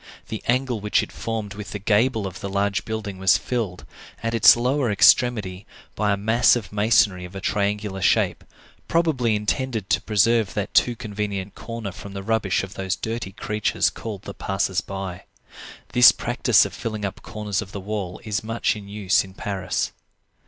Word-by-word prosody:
The 110 Hz, -, -4 dB
angle 125 Hz, -1 st, +1 dB
which 105 Hz, 0 st, +2 dB
it -, -, -8 dB
formed 110 Hz, -3 st, -4 dB
with 105 Hz, 0 st, -8 dB
the -, -, -2 dB
gable 110 Hz, +2 st, +1 dB
of 95 Hz, -1 st, -6 dB
the 100 Hz, -, -5 dB
large 100 Hz, +1 st, 0 dB
building 110 Hz, -4 st, -5 dB
was 95 Hz, -1 st, +5 dB
filled, 110 Hz, -8 st, -3 dB, 0.4 s
at 115 Hz, 0 st, -1 dB
its 115 Hz, -, +8 dB
lower 125 Hz, +1 st, +1 dB
extremity, 105 Hz, -2 st, +3 dB, 0.3 s
by 105 Hz, 0 st, 0 dB
a 100 Hz, -, +1 dB
mass 110 Hz, +5 st, +4 dB
of 110 Hz, -4 st, -5 dB
masonry 105 Hz, -3 st, +3 dB
of 90 Hz, +2 st, -10 dB
a -, -, -4 dB
triangular 100 Hz, 0 st, -1 dB
shape, -, -, +2 dB, 0.4 s
probably 140 Hz, -10 st, +1 dB
intended 110 Hz, 0 st, -2 dB
to -, -, +3 dB
preserve 110 Hz, 0 st, +2 dB
that 105 Hz, -1 st, -3 dB
too 120 Hz, -, +3 dB
convenient 105 Hz, -3 st, -4 dB
corner 115 Hz, -3 st, -6 dB
from 95 Hz, +2 st, -10 dB
the 100 Hz, -1 st, -6 dB
rubbish 105 Hz, -4 st, 0 dB
of 95 Hz, 0 st, -7 dB
those 95 Hz, 0 st, -2 dB
dirty 110 Hz, -2 st, -4 dB
creatures 105 Hz, -3 st, 0 dB
called 105 Hz, -4 st, -7 dB
the 100 Hz, -, -7 dB
passers 95 Hz, -1 st, -1 dB
by. 95 Hz, -2 st, -6 dB, 0.6 s
This 125 Hz, -1 st, +8 dB
practice -, -, +3 dB
of -, -, -6 dB
filling 110 Hz, -2 st, -4 dB
up 100 Hz, -, -5 dB
corners 105 Hz, -2 st, -3 dB
of 100 Hz, -3 st, -9 dB
the 100 Hz, -, -5 dB
wall 95 Hz, -2 st, -4 dB
is 105 Hz, -3 st, -2 dB
much 115 Hz, +1 st, 0 dB
in 105 Hz, -2 st, -9 dB
use 100 Hz, -2 st, +1 dB
in 95 Hz, -1 st, -13 dB
Paris. 100 Hz, -4 st, -2 dB
105 Hz, 180 wpm, -23 LUFS, 95-115 Hz, 0.6 s, its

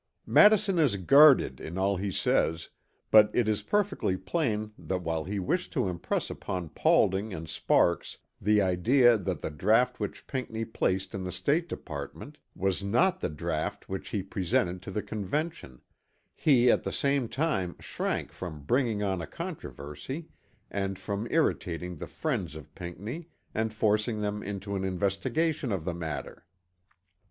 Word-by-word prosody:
Madison 210 Hz, -3 st, +5 dB
is 140 Hz, -10 st, +3 dB
guarded 140 Hz, -, +6 dB
in 85 Hz, +3 st, -6 dB
all 100 Hz, +1 st, +2 dB
he 100 Hz, +1 st, -2 dB
says, 80 Hz, -2 st, +1 dB, 0.4 s
but 105 Hz, -1 st, +8 dB
it 120 Hz, -3 st, +2 dB
is 105 Hz, -1 st, +1 dB
perfectly 195 Hz, -, 0 dB
plain 110 Hz, -, -1 dB
that 90 Hz, -3 st, -4 dB
while 80 Hz, -1 st, -1 dB
he 100 Hz, +3 st, -3 dB
wished 175 Hz, -, -1 dB
to 125 Hz, -, 0 dB
impress 85 Hz, -2 st, -2 dB
upon 90 Hz, -3 st, -4 dB
Paulding 95 Hz, +6 st, +2 dB
and 80 Hz, -1 st, -7 dB
Sparks 85 Hz, +2 st, +1 dB, 0.2 s
the 105 Hz, 0 st, +4 dB
idea 120 Hz, +7 st, +4 dB
that 95 Hz, -6 st, -3 dB
the -, -, -2 dB
draught 115 Hz, +11 st, +2 dB
which 105 Hz, -2 st, -5 dB
Pinckney 115 Hz, -4 st, -3 dB
placed 95 Hz, -4 st, -1 dB
in 95 Hz, -, -4 dB
the 90 Hz, -, -4 dB
State 145 Hz, -, 0 dB
Department 70 Hz, -3 st, -7 dB, 0.2 s
was 95 Hz, +1 st, 0 dB
not 125 Hz, -, +2 dB
the -, -, -2 dB
draught 85 Hz, +5 st, -3 dB
which 95 Hz, 0 st, -5 dB
he 100 Hz, -3 st, -2 dB
presented 90 Hz, -2 st, -1 dB
to 95 Hz, -, -8 dB
the 105 Hz, +2 st, -3 dB
Convention, 110 Hz, -, -4 dB, 0.5 s
he 125 Hz, -5 st, +4 dB
at -, -, +2 dB
the -, -, -3 dB
same 140 Hz, -4 st, +1 dB
time 125 Hz, -, -1 dB
shrank -, -, -3 dB
from 80 Hz, -6 st, -7 dB
bringing 115 Hz, -, +1 dB
on 95 Hz, -3 st, -1 dB
a 85 Hz, -, -5 dB
controversy 105 Hz, -, -7 dB, 0.4 s
and 95 Hz, -1 st, -2 dB
from 100 Hz, +4 st, -4 dB
irritating 90 Hz, -, 0 dB
the -, -, -6 dB
friends 105 Hz, -, -3 dB
of 75 Hz, -3 st, -11 dB
Pinckney 105 Hz, -, -7 dB, 0.2 s
and 110 Hz, 0 st, 0 dB
forcing 110 Hz, +1 st, +1 dB
them 105 Hz, 0 st, -2 dB
into 100 Hz, 0 st, -5 dB
an 95 Hz, -, -2 dB
investigation 100 Hz, -, 0 dB
of 90 Hz, -5 st, -2 dB
the 90 Hz, -, -1 dB
matter. 80 Hz, -2 st, -6 dB
100 Hz, 155 wpm, -29 LUFS, 90-125 Hz, 0.5 s, but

